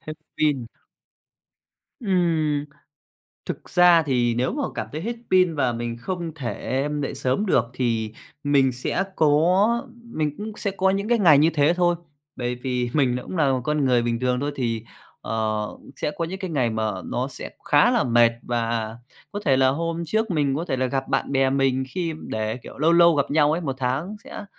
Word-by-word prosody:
Hết 155 0 -47
pin. 140 -6 +1 1.3
Ừm. 165 - +1 0.8
Thực - - -6
ra 175 -2 +6
thì 125 -5 +1
nếu 125 +2 0
mà - - -2
cảm 110 -2 -3
thấy 155 - -4
hết 230 +7 -3 0.2
pin 185 -3 +4
và 130 -5 +1
mình 115 0 -4
không 170 +2 -4
thể 135 0 -3
dậy 135 - -3
sớm 130 +12 0
được 125 - +3
thì 115 -4 -1 0.3
mình 140 -2 +3
sẽ 125 +9 -1
có 180 - +3 0.2
mình 155 -11 -3
cũng 215 +1 -5
sẽ 205 - -1
có 190 0 +1
những 200 +2 -1
cái 240 -1 +3
ngày 165 -8 +6
như 155 +3 +5
thế 150 +2 +3
thôi, 175 -1 +2 0.4
bởi 120 -1 -2
vì 125 -1 -2
mình 130 -4 +2
cũng 185 - -7
là 145 -5 +3
một 130 - 0
con 150 0 +1
người 125 -2 +3
bình 115 0 -1
thường 125 0 0
thôi, 145 +1 -2
thì, 115 -4 -2 0.4
ờ, 110 -1 -2 0.3
sẽ - - -2
có 170 - 0
những 185 +4 -5
cái 190 -2 -5
ngày 130 -7 +1
mà 110 -1 -1
nó 125 +2 -2
sẽ - - -7
khá 150 +11 +4
là 240 -4 +2
mệt 120 -1 +5
và 115 -2 -2 0.4
có 205 - -4
thể 135 -4 +4
là 130 0 +4
hôm 165 +4 -2
trước 220 +6 -1
mình 145 -5 +1
có 165 - -2
thể 135 -7 -2
là 130 0 0
gặp 135 +1 -2
bạn 135 0 -1
bè 135 -1 +3
mình 135 -1 +1
khi 170 +2 -3
để 110 +1 -2
kiểu, 125 - -12
lâu 160 +4 +3
lâu 170 0 +6
gặp 140 -2 0
nhau 150 0 +4
ấy, 165 - -1
1 135 -6 -3
tháng 135 +11 -2
sẽ - - -8
145 Hz, 200 wpm, -23 LUFS, 125-170 Hz, 1.3 s, ra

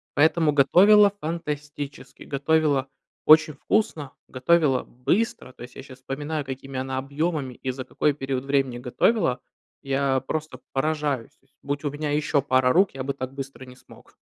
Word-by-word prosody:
поэтому 160 +1 +3
готовила- 195 +9 +6
фантастически! 150 -3 -6
Готовила 140 -1 +1 0.4
очень 155 0 +6
вкусно, 150 -6 -1
готовила 135 0 +2
быстро. 150 - -2
То 125 - -12
есть 125 - -12
я 135 - -9
сейчас 130 -1 -13
вспоминаю, 145 +3 -4
какими 135 0 -6
она 130 0 -3
объёмами 140 0 -2
и 130 - -4
за 130 0 -6
какой 150 - 0
период 135 -1 -4
времени 135 -3 0
готовила. 125 - +1 0.4
Я 135 -1 0
просто 150 -2 -5
поражаюсь. 145 -3 -1
То 135 - -36
есть 135 - -38
будь 145 +1 -4
у 145 - -1
меня 145 0 -3
ещё 145 -1 +1
пара 130 -2 +2
рук, 190 +2 +4
я 130 - -4
бы 140 +1 -2
так 130 -1 -6
быстро 135 -1 -8
не 125 0 -13
смог. - - -19
140 Hz, 165 wpm, -24 LUFS, 130-155 Hz, 0.4 s, готовила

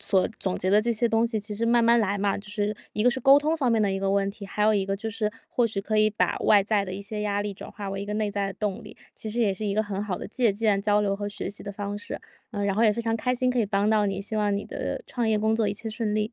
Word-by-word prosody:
所 190 -2 +2
总 190 -2 -1
结 185 - -1
的 205 +2 +6
这 235 +2 -1
些 235 +1 +1
东 225 0 +2
西， 230 -2 -1
其 210 0 -5
实 230 +3 -1
慢 235 0 +4
慢 235 0 +5
来 205 -2 0
嘛， 200 0 0
就 210 +1 -11
是 210 0 -1 0.2
一 210 - 0
个 245 - +5
是 260 - -3
沟 270 +3 +7
通 305 +2 0
方 275 -7 +1
面 225 -2 +3
的 200 -2 +1
一 195 - -1
个 195 0 0
问 200 0 +1
题， 200 0 -10
还 210 +1 -2
有 215 - +5
一 195 -2 +1
个 195 - -1
就 220 +2 -4
是 210 -1 -1 0.2
或 240 - +2
许 215 -3 -3
可 215 +2 0
以 215 - +5
把 215 - 0
外 205 -2 +5
在 205 -2 +1
的 - - -5
一 200 - -6
些 210 +1 -5
压 205 -1 0
力 205 0 -3
转 195 - -10
化 200 -2 -6
为 195 0 -4
一 200 - -5
个 210 - -3
内 210 -1 0
在 200 -1 -1
的 195 - -5
动 210 -3 -3
力， - - -12 0.2
其 220 - -6
实 230 +3 -2
也 210 -4 +3
是 190 +3 -7
一 200 - -1
个 215 - +2
很 205 -2 -4
好 200 -4 -3
的 - - -6
借 235 0 +2
鉴、 205 -1 +1
交 205 +1 +2
流 200 -1 +1
和 205 0 -4
学 200 - -4
习 200 - -8
的 200 - -5
方 205 0 -4
式。 - - -6 0.3
呃， 205 -3 -2
然 200 -1 +1
后 220 - +2
也 220 - +6
非 235 +3 -2
常 225 0 0
开 250 +3 0
心 255 0 +1
可 250 - -1
以 225 - +2
帮 200 +1 +1
到 215 -1 +3
你， 195 -1 -2
希 205 +2 -4
望 205 -1 +1
你 200 - -2
的 - - -4
创 240 -2 -1
业 215 -1 +2
工 220 +1 +2
作 220 -2 +1
一 200 - -2
切 220 +1 -5
顺 215 -1 -2
利！ 215 +1 -1
210 Hz, 370 characters per minute, -26 LUFS, 200-225 Hz, 0.3 s, 沟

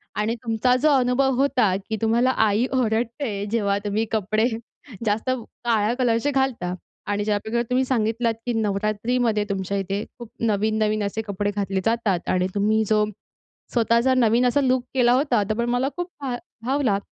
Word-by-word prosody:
आणि 210 +3 0
तुमचा 235 +2 +2
जो 305 - +4
अनुभव 255 +2 +2
होता, 255 -7 +2
की 220 - -1
तुम्हाला 230 +3 +3 0.2
आई 210 +4 +2
ओरडते, 230 -2 -1
जेव्हा 200 -3 +1
तुम्ही 210 +2 0
कपडे 215 +1 +1 0.6
जास्त 215 +4 0 0.4
काळ्या 225 -1 +2
कलरचे 245 +2 +2
घालता 265 -10 0 0.4
आणि 205 0 0
ज्याप्रकारे 220 +3 0
तुम्ही 255 +1 +2
सांगितलात, 230 -1 0
की 245 - -1
नवरात्रीमध्ये 215 +2 0
तुमच्या 195 0 -2
इथे 195 +1 -2 0.2
खूप 235 -2 -9 0.2
नवीन-नवीन 215 0 +1
असे 200 +2 -2
कपडे 205 +1 -1
घातले 195 -2 -1
जातात 225 -6 0
आणि 185 0 +2
तुम्ही 215 +2 +2
जो 215 -1 +4 0.7
स्वतःचा 235 +2 +3
नवीन 240 -1 +3
असा 285 +4 +2
लूक 255 -2 +2
केला 245 -2 +4
होता, 255 -5 +2
तर - - +2
पण 235 0 0
मला 245 +3 +1
खूप 355 0 -2
भा 260 -3 -2 0.3
भावला 260 -6 +1
225 Hz, 160 wpm, -23 LUFS, 210-250 Hz, 0.7 s, जो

